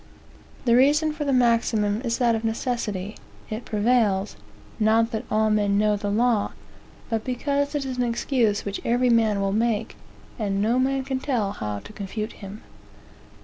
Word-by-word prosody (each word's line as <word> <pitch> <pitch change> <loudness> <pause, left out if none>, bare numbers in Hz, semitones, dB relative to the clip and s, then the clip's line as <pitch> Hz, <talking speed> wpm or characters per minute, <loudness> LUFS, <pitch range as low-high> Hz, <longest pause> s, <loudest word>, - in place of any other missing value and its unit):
"The 235 -1 +4
reason 300 +4 +4
for 300 -1 -4
the 280 - +1
maxim 230 -4 +2
is 235 -3 -1
that 240 -2 +3
of 225 0 -2
necessity. 220 -3 -2 0.3
It 220 +2 -4
prevails, 210 -3 +1 0.4
'not 225 +2 +3
that 225 +1 -3
all 215 0 +2
men 205 -1 +2
know 210 0 +3
the 205 0 -3
law, 225 0 +1 0.6
but 225 -1 0
because 280 +3 -1
it 285 -2 -1
is 260 -1 -4
an 250 - +1
excuse 235 -3 0
which 200 0 -4
every 245 +1 +2
man 220 -3 +3
will 195 0 0
make, 225 0 0 0.4
and 200 -2 -1
no 230 +5 +2
man 270 +1 +1
can 265 0 -2
tell 240 -8 -1
how 105 - -4
to - - -12
confute 215 +1 -5
him.' 200 +1 -10
225 Hz, 170 wpm, -24 LUFS, 210-250 Hz, 0.6 s, The